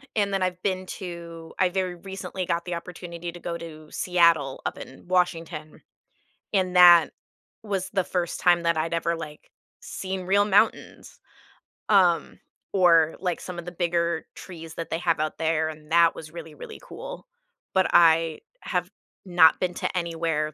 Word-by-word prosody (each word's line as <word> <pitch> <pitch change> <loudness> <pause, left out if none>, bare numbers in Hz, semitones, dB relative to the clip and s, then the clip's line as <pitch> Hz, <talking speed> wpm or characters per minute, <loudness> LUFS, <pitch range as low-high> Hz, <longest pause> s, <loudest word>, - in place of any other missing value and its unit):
and 200 -2 +1
then 195 - 0
I've 180 -1 -1
been 185 -2 -1
to 170 -3 -8
I 185 - +4
very 185 -1 -2
recently 190 0 -6
got 170 -1 -1
the 180 - -4
opportunity 170 0 -7
to 175 - -11
go 170 0 -4
to 155 -2 -10
Seattle 170 -6 +2
up - - -3
in 135 - -12
Washington, 165 -3 -1 0.7
and 185 -3 +1
that 175 -2 +8 0.5
was 195 -3 -3
the 190 -2 +1
first 175 -2 -2
time 175 -1 +3
that 170 0 +2
I'd 160 +1 -1
ever, 170 0 0
like, 150 -2 -10 0.3
seen 190 0 -5
real 195 +3 +3
mountains, 205 +2 0 0.7
um, 185 -5 +3 0.3
or, 170 -4 +4
like, 180 -2 -2
some 180 -1 -7
of 175 - -7
the 175 - -6
bigger 170 -1 -1
trees 165 -3 -10
that 165 - -6
they 160 - 0
have 170 -3 +1
out 155 0 -2
there, 160 -1 +1
and 155 -1 -11
that 170 0 +5
was 155 -1 -10
really, 165 -2 -9
really 150 - -10
cool. - - -9 0.5
But 190 -1 +3
I 165 -1 +4 0.2
have - - -2 0.4
not 175 -3 +5
been 180 -1 -1
to - - -3
anywhere, 165 -3 -1
170 Hz, 165 wpm, -25 LUFS, 165-185 Hz, 0.7 s, that